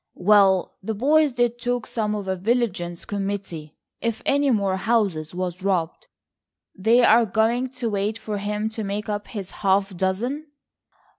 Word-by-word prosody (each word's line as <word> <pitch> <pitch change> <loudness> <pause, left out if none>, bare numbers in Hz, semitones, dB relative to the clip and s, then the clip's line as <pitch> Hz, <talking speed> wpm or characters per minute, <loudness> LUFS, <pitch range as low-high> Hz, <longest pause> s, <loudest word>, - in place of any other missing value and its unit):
"Well, 195 -1 +4
the 220 +3 -3
boys 295 +6 +3
did 240 -1 0
talk 245 -1 -1
some 220 -3 -2
of 205 -2 -5
a 190 - 0
vigilance 190 -4 -1
committee, 195 -6 -4 0.3
if 230 -1 -2
any 285 0 +2
more 200 -5 +1
houses 190 -7 0
was 180 0 -3
robbed." 180 -4 -1 0.7
"They 225 +5 +4
are 230 0 +5
going 225 +5 +1
to 250 -2 -3
wait 205 +2 -1
for 215 -2 -4
him 210 +1 -2
to 220 0 -5
make 205 +2 -4
up 205 0 -3
his 200 -4 -7
half 195 -1 +2
dozen." 235 - -2
210 Hz, 155 wpm, -23 LUFS, 190-235 Hz, 0.7 s, are